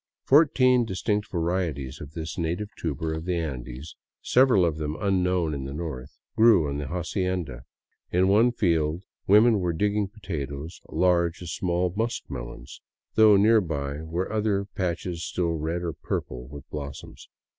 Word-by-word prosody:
Fourteen 130 Hz, -4 st, +5 dB
distinct 105 Hz, 0 st, -1 dB
varieties 80 Hz, -6 st, -2 dB
of 75 Hz, +1 st, -9 dB
this 80 Hz, -2 st, -5 dB
native 85 Hz, +5 st, -2 dB
tuber 80 Hz, 0 st, -3 dB
of 80 Hz, +1 st, -5 dB
the 90 Hz, -1 st, 0 dB
Andes, 70 Hz, -3 st, -5 dB, 0.3 s
several 125 Hz, -8 st, +4 dB
of 80 Hz, -3 st, -1 dB
them 75 Hz, 0 st, -3 dB
unknown 90 Hz, -4 st, +1 dB
in 70 Hz, -2 st, -4 dB
the 70 Hz, +1 st, -6 dB
North, 75 Hz, -5 st, -6 dB, 0.2 s
grew 110 Hz, -9 st, +5 dB
on 70 Hz, 0 st, -3 dB
the 70 Hz, -, -4 dB
hacienda. 85 Hz, -, -3 dB, 0.5 s
In 90 Hz, +2 st, +3 dB
one 110 Hz, +5 st, +5 dB
field 85 Hz, -5 st, 0 dB, 0.2 s
women 105 Hz, +2 st, +6 dB
were 90 Hz, -2 st, 0 dB
digging 105 Hz, +3 st, 0 dB
potatoes 80 Hz, -6 st, -6 dB
large 85 Hz, -1 st, +1 dB
as 85 Hz, -, -6 dB
small 90 Hz, -1 st, 0 dB
muskmelons, 60 Hz, -, -5 dB, 0.3 s
though 110 Hz, -2 st, +7 dB
nearby 80 Hz, -10 st, +2 dB
were 85 Hz, +6 st, -3 dB
other 105 Hz, -2 st, +1 dB
patches 90 Hz, -3 st, -3 dB
still 85 Hz, -2 st, -1 dB
red 80 Hz, +2 st, -2 dB
or 85 Hz, -2 st, -2 dB
purple 60 Hz, -2 st, -5 dB
with 70 Hz, 0 st, -10 dB
blossoms. 70 Hz, -2 st, -8 dB
85 Hz, 145 wpm, -26 LUFS, 75-100 Hz, 0.5 s, though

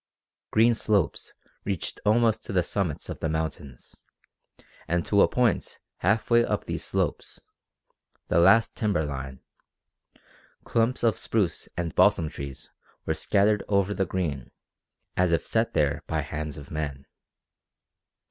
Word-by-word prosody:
Green 115 Hz, +2 st, +4 dB
slopes 105 Hz, -5 st, 0 dB, 0.3 s
reached 95 Hz, -4 st, -4 dB
almost 110 Hz, 0 st, +3 dB
to -, -, -6 dB
the 90 Hz, -2 st, +2 dB
summits 90 Hz, -4 st, -2 dB
of -, -, -6 dB
the 80 Hz, -, -1 dB
mountains, 80 Hz, -5 st, -5 dB, 0.9 s
and 85 Hz, 0 st, 0 dB
to 100 Hz, -1 st, +3 dB
a -, -, +6 dB
point 120 Hz, -6 st, 0 dB, 0.2 s
half 105 Hz, +6 st, 0 dB
way 120 Hz, 0 st, +6 dB
up -, -, -2 dB
these -, -, -4 dB
slopes -, -, -2 dB, 0.9 s
the -, -, +2 dB
last 100 Hz, +6 st, +5 dB
timber 100 Hz, -9 st, 0 dB
line 70 Hz, -2 st, -6 dB, 1.2 s
clumps 115 Hz, +2 st, 0 dB
of 115 Hz, -3 st, +2 dB
spruce 105 Hz, -6 st, -1 dB
and 85 Hz, -2 st, -2 dB
balsam 80 Hz, -2 st, +4 dB
trees 70 Hz, -2 st, -7 dB, 0.3 s
were 80 Hz, -, 0 dB
scattered 100 Hz, +5 st, +2 dB
over 100 Hz, 0 st, +1 dB
the 95 Hz, -2 st, -1 dB
green 75 Hz, -9 st, -3 dB, 0.7 s
as 90 Hz, -1 st, +2 dB
if 85 Hz, -, +1 dB
set 115 Hz, 0 st, 0 dB
there 75 Hz, 0 st, +1 dB
by 80 Hz, -1 st, -1 dB
hands 75 Hz, +1 st, -5 dB
of 70 Hz, -1 st, -11 dB
men. 70 Hz, -3 st, -4 dB
90 Hz, 140 wpm, -26 LUFS, 75-105 Hz, 1.2 s, a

